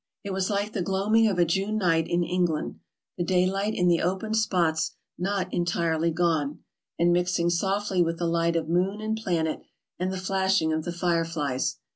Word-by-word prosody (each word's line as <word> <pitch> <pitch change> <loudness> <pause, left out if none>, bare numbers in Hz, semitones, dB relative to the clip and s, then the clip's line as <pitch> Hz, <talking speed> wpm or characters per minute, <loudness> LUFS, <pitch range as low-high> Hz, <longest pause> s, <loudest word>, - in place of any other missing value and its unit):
It 200 -2 -4
was 190 0 -1
like 205 +1 -1
the 200 - -1
gloaming 200 +5 +2
of 195 -4 0
a 175 - +4
June 195 +5 0
night 165 -5 +2
in 175 0 +1
England, 175 -3 -1 0.4
the - - +1
daylight 190 +4 +1
in 180 - +2
the 170 -1 +3
open 190 +5 -1
spots 175 -7 +1 0.2
not 190 0 -2
entirely 170 -1 +1
gone, 160 -4 0 0.3
and 175 +1 +3
mixing 175 -1 +1
softly 195 +1 0
with 165 -1 0
the 170 - -2
light 170 0 +1
of 165 -1 0
moon 185 +5 +1
and 220 +1 -2
planet 170 -7 -1 0.4
and 185 +1 -1
the 190 - -3
flashing 190 -3 +1
of 155 0 -2
the 175 - -2
fire 170 -1 +1
flies. 145 -6 -2
175 Hz, 185 wpm, -26 LUFS, 165-195 Hz, 0.4 s, a